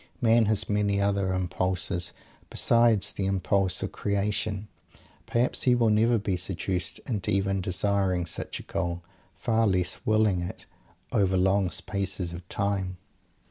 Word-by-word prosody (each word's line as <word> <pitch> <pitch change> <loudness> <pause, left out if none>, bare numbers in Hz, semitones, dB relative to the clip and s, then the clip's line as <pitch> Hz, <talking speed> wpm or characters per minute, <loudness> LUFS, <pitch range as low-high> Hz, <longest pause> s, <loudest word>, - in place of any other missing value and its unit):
Man 115 -2 +4
has 110 -1 +2
many 105 -1 +1
other 100 -1 +1
impulses 90 -1 -1 0.4
besides 115 -4 +3
the 95 - -2
impulse 95 0 +1
of - - -3
creation. 100 0 -2 0.6
Perhaps 120 +2 +1
he 125 -1 +4
will 115 -3 +3
never 115 +3 +3
be 100 -3 -1
seduced 90 -2 -2
into 110 -7 -2
even 95 0 +1
desiring 95 -1 0
such 85 - -4
a - - -9
goal, 85 0 -3 0.3
far 115 0 +1
less 90 -2 0
"willing" 110 -4 +2
it 90 +2 -7 0.5
over 95 -2 +2
long 95 0 +2
spaces 95 -2 -2
of 90 0 -10
time. 95 -2 -1
100 Hz, 140 wpm, -27 LUFS, 90-105 Hz, 0.6 s, Man